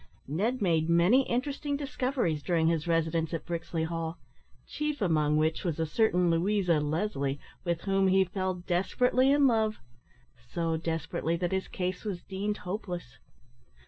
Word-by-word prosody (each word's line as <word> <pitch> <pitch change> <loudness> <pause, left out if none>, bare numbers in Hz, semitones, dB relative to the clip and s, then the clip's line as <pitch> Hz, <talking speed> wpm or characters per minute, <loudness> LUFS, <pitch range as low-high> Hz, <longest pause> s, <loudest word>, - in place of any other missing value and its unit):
Ned 210 - -1
made 165 -3 +2
many 180 +11 +4
interesting 285 +3 -1
discoveries 255 - -1
during 165 0 +1
his 165 0 +1
residence 165 0 +1
at - - -5
Brixley 165 -1 -3
Hall, 165 0 -3 0.5
chief 300 -1 -3
among 155 -6 +2
which 160 +1 +1
was 165 -3 -2
a 160 - +1
certain 180 0 +2
Louisa 175 -1 +2
Leslie, 150 -3 -1 0.2
with 170 -2 -1
whom 195 -1 +2
he 190 0 +5
fell 185 0 -2
desperately 195 +9 +1
in 285 0 +5
love 220 -4 +2 0.7
so 165 -1 0
desperately 165 0 -2
that 175 0 -2
his 190 0 -1
case 185 0 -3
was 195 -5 -4
deemed 205 +2 -3
hopeless. 180 - -5
175 Hz, 145 wpm, -29 LUFS, 165-210 Hz, 0.7 s, he